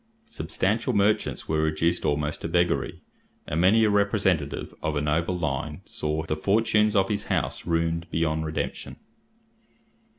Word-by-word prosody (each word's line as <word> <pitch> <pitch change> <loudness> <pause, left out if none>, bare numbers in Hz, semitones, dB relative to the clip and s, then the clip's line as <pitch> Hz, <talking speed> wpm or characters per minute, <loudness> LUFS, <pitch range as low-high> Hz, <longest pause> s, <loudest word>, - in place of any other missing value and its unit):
Substantial 115 - -1
merchants 105 0 +1
were 80 0 +1
reduced 80 +2 0
almost 75 +1 -1
to - - -3
beggary, 85 +1 0 0.4
and 80 +3 -1
many 105 +5 +5
a 110 - +4
representative 100 -8 +1
of 80 0 -1
a 75 - 0
noble 80 +4 0
line 75 -5 -3
saw 75 +1 -3
the 80 -1 -2
fortunes 105 +4 +2
of 95 -1 +4
his 105 0 -2
house - - -2
ruined 85 0 0
beyond 80 -1 0
redemption. 80 0 -4
85 Hz, 140 wpm, -26 LUFS, 80-100 Hz, 0.4 s, many